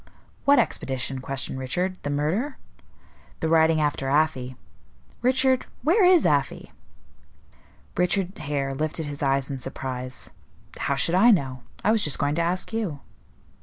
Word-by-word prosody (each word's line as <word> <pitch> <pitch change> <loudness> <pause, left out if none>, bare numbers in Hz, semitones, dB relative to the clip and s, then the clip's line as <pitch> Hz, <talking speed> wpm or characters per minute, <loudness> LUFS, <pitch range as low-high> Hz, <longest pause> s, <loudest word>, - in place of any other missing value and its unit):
"What 280 0 +6
expedition?" 135 - 0
questioned 135 0 -2
Richard. 180 +8 -2
"The 145 - -4
murder?" 170 - -1 0.8
"The 160 - -1
riding 160 0 +4
after 145 -3 0
Afy. 135 -4 +1 0.7
Richard, 260 +1 +2 0.2
where 365 +8 +4
is 360 -2 +6
Afy?" 145 -2 0 1.2
Richard 185 +1 0
Hare 140 -2 -2
lifted 155 +3 -2
his 145 0 -6
eyes 135 0 +1
in 135 - -4
surprise. 130 0 -5 0.5
"How 140 - 0
should 140 +5 +1
I 200 +7 +6
know? 135 - +2 0.2
I 215 - +3
was 220 -1 +2
just 150 - +2
going 145 0 0
to 170 - 0
ask 180 +6 -2
you." 195 -11 -3
150 Hz, 140 wpm, -25 LUFS, 135-190 Hz, 1.2 s, What